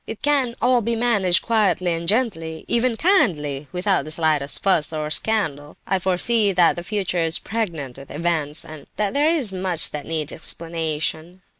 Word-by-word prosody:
It 225 - -8
can 275 -5 +1
all 250 0 +4
be 230 +2 -1
managed 205 -7 +2
quietly 190 -6 +1
and 165 0 -5
gently, 175 -8 -1
even 235 0 +1
kindly, 175 - +2
and 140 +2 -12
without 185 -2 0
the 155 - -8
slightest 155 -3 0
fuss 170 -6 +2
or 155 -1 -4
scandal. 155 -9 -1
I 190 0 0
foresee 200 +4 +1
that 175 -2 +4
the 175 - -5
future 190 -1 -2
is 165 -1 +1
pregnant 165 - -4
with 135 0 -12
events, 160 -1 +1
and 155 -2 -11
that 210 -2 -1
there 290 +2 +2
is 280 -12 +3
much 185 -3 +2
that 150 -1 -6
needs 160 -2 -2
explanation. 165 +1 -2
175 Hz, 175 wpm, -22 LUFS, 155-220 Hz, -, all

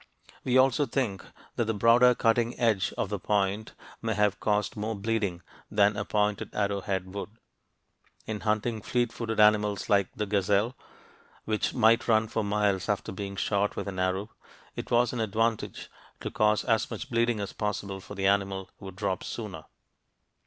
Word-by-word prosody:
We 130 0 +2
also 135 +2 +4
think 115 -6 -1 0.3
that 120 - +1
the 110 0 -1
broader 120 +4 +5
cutting 115 +1 +1
edge 110 -6 +2
of - - -1
the 105 -1 -3
point 100 +2 0 0.3
may 110 -2 -1
have 105 -1 +2
caused 105 -1 0
more 110 +1 -3
bleeding 100 -4 -2 0.3
than 105 0 +3
a 105 - -2
pointed 105 0 -1
arrowhead 95 -2 -1
would. 100 - -5 1.0
In 110 -1 -4
hunting 110 +1 -1
fleet 120 +1 0
footed 110 -2 -3
animals 105 -1 +3
like 100 -2 +4
the 105 - -2
gazelle, 100 +4 +1 0.7
which 110 -1 -1
might 115 -1 +4
run 110 -1 +3
for 110 0 -1
miles 100 -2 0
after 105 - -1
being 100 +1 -5
shot 100 +1 0
with - - -4
an 95 -2 -4
arrow, 95 +3 -1 0.4
it - - -6
was 120 0 +3
an 120 - -3
advantage 110 +1 -1 0.3
to - - -4
cause 105 0 +2
as 115 -3 +1
much - - -6
bleeding 115 -1 +1
as 100 - -4
possible, 100 -2 -3
for 100 - -10
the 95 -1 -2
animal 95 -1 +1
would 95 -1 -9
drop 95 -2 -2
sooner. 100 -9 -6
105 Hz, 165 wpm, -28 LUFS, 100-115 Hz, 1.0 s, broader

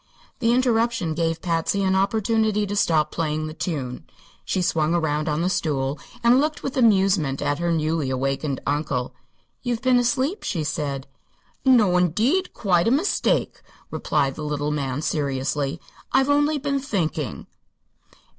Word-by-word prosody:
The 230 -2 +2
interruption 235 -7 +1
gave 165 0 -1
Patsy 170 +3 0
an 190 0 +2
opportunity 215 +2 +1
to 205 +1 -4
stop 155 -6 +2
playing 155 -1 -2
the 155 - -6
tune. 140 -7 -4 0.4
She - - -1
swung 160 -1 +1
around 155 -2 0
on 150 +2 0
the - - +1
stool 140 -5 -1 0.2
and 240 +2 +5
looked 305 +1 -2
with 270 - -3
amusement 195 - +3
at 145 +1 -1
her 170 0 0
newly 155 -3 0
awakened 135 +2 -2
uncle. 140 -4 -1 0.5
"You've 245 -1 -2
been 255 -1 +4
asleep," 265 - 0
she 165 -6 -2
said. 145 -3 -3 0.6
"No, 220 -9 +5
indeed; 225 - +1
quite 180 -3 +2
a - - +5
mistake," 295 - +1 0.3
replied 140 -3 0
the 155 - -7
little 150 0 -2
man, 140 -1 -2
seriously. 140 +1 -1 0.3
"I've 270 +1 +3
only 290 +1 +3
been 280 0 -1
thinking." 170 - -3
170 Hz, 145 wpm, -23 LUFS, 150-230 Hz, 0.6 s, and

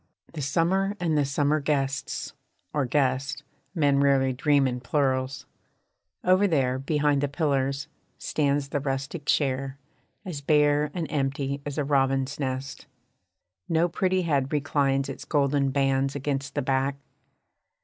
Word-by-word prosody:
The 155 - -5
summer 185 +8 +1
and 165 -3 0
the 145 -1 +3
summer 145 +2 +1
guests, 140 -2 -2 0.4
or 145 -4 0
guest. 135 0 0 0.3
(Men 145 -4 +3
rarely 135 -2 +3
dream 140 +1 +3
in 125 -1 -2
plurals.) 130 0 -1 0.8
Over 185 +3 +4
there 130 -6 +1
Beyond 145 0 +1
the 145 - +1
pillars, 140 -1 -1 0.3
stands 140 -2 0
the 145 - -1
rustic 135 +3 -3
chair, 135 -1 0 0.5
As 165 -7 -5
bare 150 0 +3
and 170 -3 -1
empty 140 -1 -1
as 145 - -5
a 150 - +1
robin's 135 0 +1
nest. 135 0 -4 0.8
No 165 +1 +3
pretty 185 +2 0
head 140 -5 0
reclines 140 -2 +1
its 135 - -7
golden 140 -2 +1
bands 135 0 +1
Against 140 -1 -3
the - - 0
back. 135 +1 0
140 Hz, 135 wpm, -26 LUFS, 135-150 Hz, 0.8 s, Over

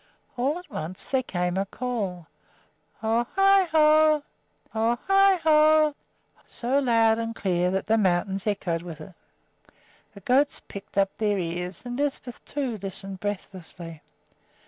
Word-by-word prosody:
All 270 +6 0
at 360 - -11
once 165 +4 -6
there 265 -1 +2
came 180 -6 -2
a 195 - 0
call, 200 -8 -4 0.8
"Ho 225 +2 +1
i 390 -1 +5
ho! 310 -1 +5 0.5
ho 225 +2 +1
i 390 0 +5
ho!" 310 -1 +5 0.5
so 255 +4 -1
loud 230 -4 +3
and 230 0 -3
clear 180 -3 0
that 190 +1 -1
the 225 +1 +2
mountains 190 +1 0
echoed 180 -5 -1
with 170 -3 -9
it. 170 +5 -11 1.0
The 200 - -12
goats 270 +8 +2
pricked 200 0 -11
up 195 -1 +2
their 210 -2 +1
ears, 180 0 -4
and 245 +1 -5
Lisbeth, 275 -4 -3
too, 260 -7 -3
listened 195 0 -4
breathlessly. 180 -5 -7
220 Hz, 140 wpm, -25 LUFS, 185-280 Hz, 1.0 s, i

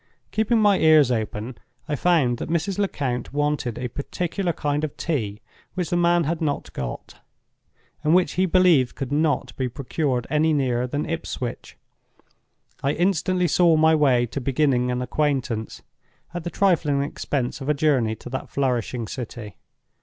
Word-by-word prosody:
Keeping 220 +2 +2
my 205 -2 +4
ears 155 -5 +5
open, 110 +1 -3 0.3
I 150 - -1
found 145 -7 +2
that - - -5
Mrs. 175 +4 -1
Lecount 130 -11 -2
wanted 145 -4 -1
a 125 - -3
particular 175 - -3
kind 150 -1 -2
of 155 - -4
tea 110 -10 -2 0.3
which 180 -4 -2
the - - +2
man 175 0 +3
had 165 +2 -2
not 145 -3 -2
got, 65 -2 -6 0.8
and 155 +3 +4
which 180 -1 +3
he 185 +1 +1
believed 175 -8 +4
could 135 -1 -5
not 150 +1 0
be 130 -1 -1
procured 130 -1 -2
any 155 +1 +2
nearer 125 -4 0
than 145 +4 -3
Ipswich. 130 -7 -5 1.0
I 140 +2 +1
instantly 180 +1 +1
saw 170 0 +4
my 160 +1 +5
way 135 -6 +3
to 135 +4 -5
beginning 130 -1 +1
an 125 0 -1
acquaintance, 130 -6 -2 0.5
at 175 -1 -4
the - - -1
trifling 160 -7 +2
expense 140 -3 -3
of 135 - -4
a 150 - +3
journey 135 -7 +2
to 115 - -10
that 130 - -4
flourishing 125 -3 -1
city. 115 -5 -7
145 Hz, 160 wpm, -23 LUFS, 125-165 Hz, 1.0 s, ears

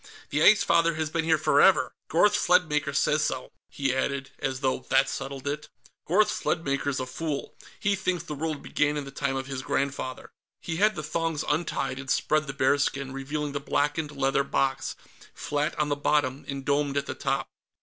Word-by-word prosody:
"The - - +1
Ice 210 - +7
Father 170 -1 +3
has 155 -1 -2
been 165 0 0
here 160 -1 +4
forever. 155 +4 +4
Gorth 190 +5 +4
Sledmaker 155 -5 +2
says 150 +2 +2
so," 130 -3 -2 0.2
he 135 -2 -1
added, 135 +1 -2
as 135 -1 -2
though 130 -2 +1
that 135 0 +4
settled 135 0 -5
it. 150 +1 -3 0.4
"Gorth 205 +6 +4
Sledmaker's 140 -3 -1
a 130 - -2
fool. 145 +3 -4 0.3
He 205 -2 +2
thinks 185 -2 -1
the - - -6
world 155 0 -3
began 150 0 0
in 145 - -3
the 135 - -8
time 140 -1 -2
of 135 0 -3
his 135 -1 -4
grandfather." 135 -1 -3 0.3
He 165 -1 -4
had 210 +2 +3
the 155 - -4
thongs 165 0 -2
untied, 150 -4 -1
and 135 -1 -8
spread 155 +3 +1
the 135 - -4
bearskin, 140 0 +1
revealing 145 +2 -3
the 145 - -3
blackened 145 +2 0
leather 135 -1 +1
box, 135 -1 -1 0.4
flat 145 +1 -2
on 150 -1 +1
the 145 - +1
bottom 145 -2 0
and 140 -1 -5
domed 140 0 +1
at 140 - 0
the - - -4
top. 135 0 -1
145 Hz, 190 wpm, -27 LUFS, 135-155 Hz, 0.4 s, Ice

